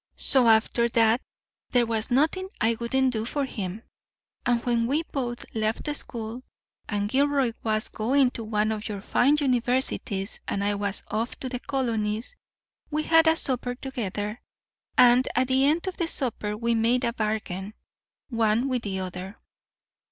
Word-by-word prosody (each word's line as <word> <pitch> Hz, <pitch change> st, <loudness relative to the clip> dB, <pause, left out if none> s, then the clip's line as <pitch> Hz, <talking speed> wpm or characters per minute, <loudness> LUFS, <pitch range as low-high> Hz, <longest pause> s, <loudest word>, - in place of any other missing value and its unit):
So, 260 Hz, -4 st, +3 dB
after 230 Hz, +1 st, +4 dB
that, 230 Hz, +1 st, +3 dB, 0.5 s
there 245 Hz, -1 st, +3 dB
was 225 Hz, 0 st, -1 dB
nothing 315 Hz, +9 st, +2 dB
I 230 Hz, +1 st, +2 dB
wouldn't 260 Hz, +2 st, +1 dB
do 220 Hz, -1 st, -1 dB
for 275 Hz, +4 st, -2 dB
him; 205 Hz, -3 st, -5 dB, 0.6 s
and 240 Hz, -1 st, +3 dB
when 235 Hz, -1 st, +1 dB
we 295 Hz, +6 st, +1 dB
both 245 Hz, -6 st, -4 dB
left 225 Hz, +7 st, -1 dB
school, 230 Hz, -2 st, -5 dB, 0.5 s
and 205 Hz, -1 st, -1 dB
Gilroy 275 Hz, +1 st, +2 dB
was 215 Hz, -1 st, 0 dB
going 255 Hz, +4 st, +2 dB
to 230 Hz, -, -5 dB
one 215 Hz, 0 st, 0 dB
of 215 Hz, +1 st, -4 dB
your 205 Hz, -2 st, -4 dB
fine 280 Hz, +7 st, +3 dB
universities 245 Hz, -6 st, 0 dB
and 200 Hz, -, -1 dB
I 205 Hz, +1 st, +1 dB
was 200 Hz, -1 st, -2 dB
off 225 Hz, +3 st, -2 dB
to 260 Hz, -, -3 dB
the 250 Hz, -1 st, -4 dB
colonies, 230 Hz, -, -2 dB, 0.5 s
we 305 Hz, 0 st, -1 dB
had 325 Hz, +1 st, +5 dB
a 320 Hz, -, +5 dB
supper 250 Hz, -5 st, 0 dB
together, 215 Hz, -5 st, -4 dB, 0.6 s
and 250 Hz, +1 st, +6 dB
at 255 Hz, +1 st, +2 dB
the 265 Hz, +1 st, +4 dB
end 320 Hz, +5 st, +2 dB
of 375 Hz, -1 st, -4 dB
the 340 Hz, -, 0 dB
supper 220 Hz, -8 st, -2 dB
we 235 Hz, +1 st, 0 dB
made 230 Hz, +3 st, +2 dB
a 235 Hz, -, 0 dB
bargain 210 Hz, -2 st, -3 dB, 0.6 s
one 230 Hz, +2 st, +2 dB
with 250 Hz, -2 st, 0 dB
the 190 Hz, -3 st, -3 dB
other. 185 Hz, +2 st, -6 dB
235 Hz, 160 wpm, -26 LUFS, 215-265 Hz, 0.6 s, and